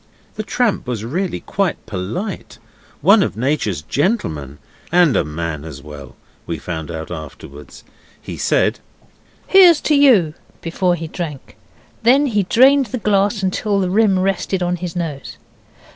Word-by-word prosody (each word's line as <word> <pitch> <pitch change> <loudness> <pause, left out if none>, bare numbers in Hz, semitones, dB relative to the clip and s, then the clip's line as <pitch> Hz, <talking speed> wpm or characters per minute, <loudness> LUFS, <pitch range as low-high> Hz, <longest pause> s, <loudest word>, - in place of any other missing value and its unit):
The - - -4
tramp 220 - -1
was 115 -3 -3
really 175 +9 -3
quite 195 -3 -2
polite 110 - -5 0.4
one 200 +7 +6
of 110 - -2
Nature's 115 - -1
gentlemen, 80 - -2 0.3
and 175 -5 +4
a - - +2
man 75 0 -5
as 80 -4 -9
well, 75 -3 -11 0.3
we 85 - -3
found 80 0 -6
out 80 0 -6
afterwards. 75 -3 -10 0.4
He - - -8
said - - +1 0.7
'Here's 360 -5 +7
to 305 - +1
you!' 235 - +5 0.3
before 175 +2 0
he 165 -1 -6
drank. 155 -5 -7 0.5
Then 265 +5 +4
he 215 -7 +1
drained 260 +7 +4
the 235 - -4
glass 205 -1 +1
till 205 0 -1
the 185 -2 -1
rim 205 -1 +3
rested 190 0 -1
on 180 0 -1
his 175 -1 -6
nose. 155 -6 -5
175 Hz, 145 wpm, -19 LUFS, -, 0.7 s, Here's